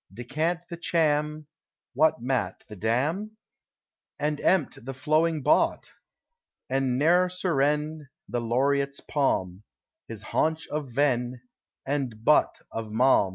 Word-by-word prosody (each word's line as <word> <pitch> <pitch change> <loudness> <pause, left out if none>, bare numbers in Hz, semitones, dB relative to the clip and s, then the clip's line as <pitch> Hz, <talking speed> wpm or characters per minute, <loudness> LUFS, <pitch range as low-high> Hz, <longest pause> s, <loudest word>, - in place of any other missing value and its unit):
Decant 155 - -2
the 170 - -7
cham: 150 -2 0 0.5
(What 140 -3 +2
matt: 125 -8 -1
the 105 - -9
dam:?) 150 - -1 0.8
And 150 0 -1
empt: 180 -11 +1
the 135 +1 -6
flowing 155 +2 +1
bott:! - - +2 0.8
And 130 -1 0
ne'er 175 +6 +4
surren: 150 -4 0 0.2
The 120 0 -2
Laureate's 140 +4 +1
palm, 95 -10 -1 0.5
His 110 -2 -7
haunch 160 +7 0
of 150 -3 -3
ven: 125 -2 0 0.4
And 130 -6 -3
butt 150 - +3
of 115 -1 -4
Malm 110 -2 +3
140 Hz, 115 wpm, -27 LUFS, 120-155 Hz, 0.8 s, ne'er